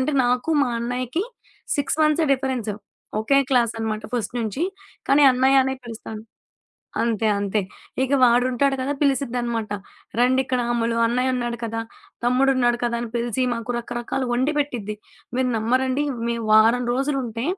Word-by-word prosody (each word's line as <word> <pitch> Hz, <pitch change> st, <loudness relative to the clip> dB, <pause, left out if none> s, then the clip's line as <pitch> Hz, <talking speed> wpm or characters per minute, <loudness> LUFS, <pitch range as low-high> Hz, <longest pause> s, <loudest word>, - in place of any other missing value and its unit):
అంటే 260 Hz, +4 st, 0 dB
నాకు 250 Hz, +6 st, +1 dB
మా 250 Hz, -, +1 dB
అన్నయ్యకి 250 Hz, -, -2 dB, 0.5 s
6 285 Hz, +1 st, -1 dB
మంత్సే 305 Hz, +1 st, +3 dB
డిఫరెన్స్. 260 Hz, -5 st, -1 dB, 0.5 s
ఒకే 275 Hz, +6 st, +3 dB
క్లాస్ 240 Hz, -4 st, +3 dB
అనమాట 220 Hz, -1 st, -3 dB
ఫస్ట్ 240 Hz, -3 st, -2 dB
నుంచి. 225 Hz, +6 st, -2 dB, 0.5 s
కానీ 285 Hz, +2 st, +5 dB
అన్నయనే 265 Hz, +1 st, +3 dB
పిలుస్తాను. 225 Hz, -2 st, -8 dB, 0.8 s
అంతే 225 Hz, -1 st, +1 dB
అంతే. 200 Hz, +1 st, 0 dB, 0.4 s
ఇక 265 Hz, +1 st, -1 dB
వాడుంటాడు 250 Hz, +3 st, +3 dB
గదా! 265 Hz, +2 st, -1 dB
పిలిసిద్దనమాట. 240 Hz, -5 st, 0 dB, 0.5 s
రండిక్కడ 255 Hz, 0 st, +2 dB
అమ్ములు 230 Hz, -1 st, 0 dB
అన్నయ్య 250 Hz, +2 st, +1 dB
ఉన్నాడు 240 Hz, -1 st, -2 dB
కదా! 225 Hz, 0 st, -3 dB, 0.4 s
తమ్ముడు 255 Hz, +3 st, +3 dB
ఉన్నాడు 240 Hz, -1 st, +2 dB
కదా! 235 Hz, 0 st, 0 dB
అని 240 Hz, -, -4 dB
పిలిసి 240 Hz, +1 st, -1 dB
మాకు 230 Hz, +1 st, -5 dB
రకరకాలు 240 Hz, +2 st, -3 dB
వండి 260 Hz, +5 st, +1 dB
పెట్టిద్ది. 240 Hz, -8 st, -2 dB, 0.4 s
మీరు 255 Hz, 0 st, +1 dB
నమ్మరండి 255 Hz, +5 st, +1 dB, 0.2 s
మేం 235 Hz, 0 st, -1 dB
వారం 225 Hz, +3 st, +5 dB
రోజులుంటే, 255 Hz, -3 st, -1 dB
245 Hz, 135 wpm, -23 LUFS, 230-265 Hz, 0.8 s, కానీ